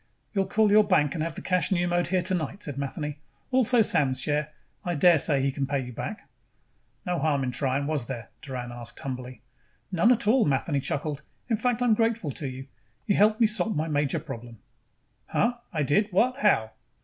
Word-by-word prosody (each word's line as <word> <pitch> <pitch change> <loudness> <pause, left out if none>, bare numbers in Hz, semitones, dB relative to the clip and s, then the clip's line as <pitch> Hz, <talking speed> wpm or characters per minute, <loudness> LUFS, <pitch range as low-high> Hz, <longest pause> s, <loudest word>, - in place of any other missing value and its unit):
"You'll 195 -2 +1
call 215 +1 +3
your 215 +1 +7
bank 165 -8 +2
and 165 - -3
have 165 -1 -4
the - - -7
cash 185 0 +1
pneumoed 175 -1 +1
here 185 0 +1
tonight," 185 +2 -2
said 145 - -5
Matheny. 145 +1 -4 0.3
"Also 250 -2 +4
Sam's 140 -9 +1
share. 150 0 -1 0.3
I 175 -1 -2
daresay 150 -3 +4
he 135 - +1
can 135 0 -2
pay 140 0 0
you 125 -1 -6
back." - - -6 0.8
"No 180 -1 -1
harm 145 -2 +1
in 125 - -1
trying, 135 +2 -1
was 145 -5 -2
there?" 120 -3 -6
asked - - -42
Doran 125 -3 -6
humbly. 125 +1 -7 0.5
"None 190 +7 +4
at 235 -3 +2
all." 240 +2 +5
Matheny 140 +1 0
chuckled. 145 +2 -3 0.3
"In 225 - +2
fact, 245 +2 0
I'm 240 -3 +4
grateful 225 -7 0
to 140 +2 -5
you. 130 0 -7 0.4
You 200 - +2
helped 215 +2 +4
me - - +7
solve 215 -1 +1
my 155 +2 -1
major 145 -3 0
problem." 120 -6 -9 0.7
"Huh? 240 +1 +1
I 155 -3 0
did 195 +10 +2
what? 240 +7 +2
How?" 110 - +3
155 Hz, 195 wpm, -27 LUFS, 135-205 Hz, 0.8 s, your